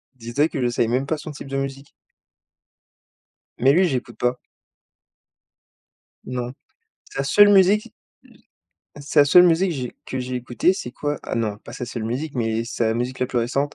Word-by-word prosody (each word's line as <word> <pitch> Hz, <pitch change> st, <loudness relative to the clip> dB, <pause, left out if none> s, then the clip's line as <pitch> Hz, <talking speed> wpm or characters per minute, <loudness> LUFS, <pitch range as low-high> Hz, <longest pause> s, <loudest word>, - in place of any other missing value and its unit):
Dis 120 Hz, -1 st, -9 dB
toi 150 Hz, +2 st, +4 dB
que 135 Hz, -, -4 dB
je 125 Hz, -, +2 dB
savais 120 Hz, -1 st, 0 dB
même 130 Hz, +4 st, 0 dB
pas 160 Hz, -, -1 dB
son 150 Hz, +1 st, -8 dB
type 140 Hz, -1 st, -9 dB
de 135 Hz, 0 st, -3 dB
musique. 135 Hz, 0 st, -5 dB, 1.7 s
Mais 135 Hz, +2 st, +5 dB
lui, 185 Hz, +3 st, +4 dB
j'écoute 125 Hz, -5 st, -4 dB
pas. 125 Hz, +1 st, +1 dB, 1.9 s
Non, 125 Hz, 0 st, -4 dB, 0.6 s
sa 135 Hz, -, -3 dB
seule 205 Hz, +9 st, +6 dB
musique 205 Hz, +3 st, +4 dB, 1.1 s
sa 145 Hz, +1 st, +3 dB
seule 175 Hz, +5 st, +7 dB
musique 180 Hz, +2 st, +3 dB
j'ai 130 Hz, -5 st, -5 dB
que 130 Hz, -, -5 dB
j'ai 125 Hz, 0 st, -4 dB
écoutée, 125 Hz, +8 st, +1 dB
c'est 120 Hz, -, -6 dB
quoi? 145 Hz, +3 st, -3 dB
Ah -, -, -4 dB
non, 110 Hz, -3 st, -1 dB
pas 115 Hz, -, -12 dB
sa 125 Hz, 0 st, -6 dB
seule 120 Hz, -2 st, -5 dB
musique, 135 Hz, +7 st, -3 dB
mais 115 Hz, -1 st, -1 dB
sa 115 Hz, -1 st, -1 dB
musique, 125 Hz, +3 st, -3 dB
la 125 Hz, -, +1 dB
plus 125 Hz, -, -1 dB
récente, 135 Hz, +5 st, -1 dB
130 Hz, 175 wpm, -22 LUFS, 120-150 Hz, 1.9 s, seule